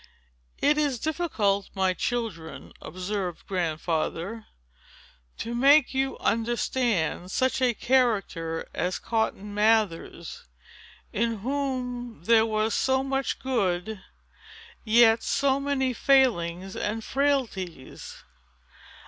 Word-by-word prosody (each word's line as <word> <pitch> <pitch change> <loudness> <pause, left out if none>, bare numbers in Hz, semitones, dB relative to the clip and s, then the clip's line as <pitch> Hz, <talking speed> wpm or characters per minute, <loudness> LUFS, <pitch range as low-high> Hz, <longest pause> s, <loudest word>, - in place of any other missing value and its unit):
"It 295 +1 +2
is 285 -4 +1
difficult, 225 - -1
my 190 -1 +2
children," 205 -8 -4
observed 185 -1 -4
Grandfather, 170 +3 -2 0.9
"to 230 - -4
make 275 +3 +5
you 270 0 -1
understand 225 -6 0
such 260 +6 0
a 245 -2 +2
character 200 -11 0
as 180 +2 -1
Cotton 215 -3 -2
Mather's, 210 -6 0 0.7
in 230 -1 -1
whom 250 -2 -3
there 225 -1 +4
was 215 0 0
so 265 +3 +1
much 270 0 -1
good, 200 -8 -1
and 220 -3 -6 0.8
yet 225 0 +5
so 275 -1 +1
many 275 -2 0
failings 195 -10 +2
and 220 +2 -3
frailties. 240 - -2
225 Hz, 100 wpm, -26 LUFS, 190-260 Hz, 0.9 s, make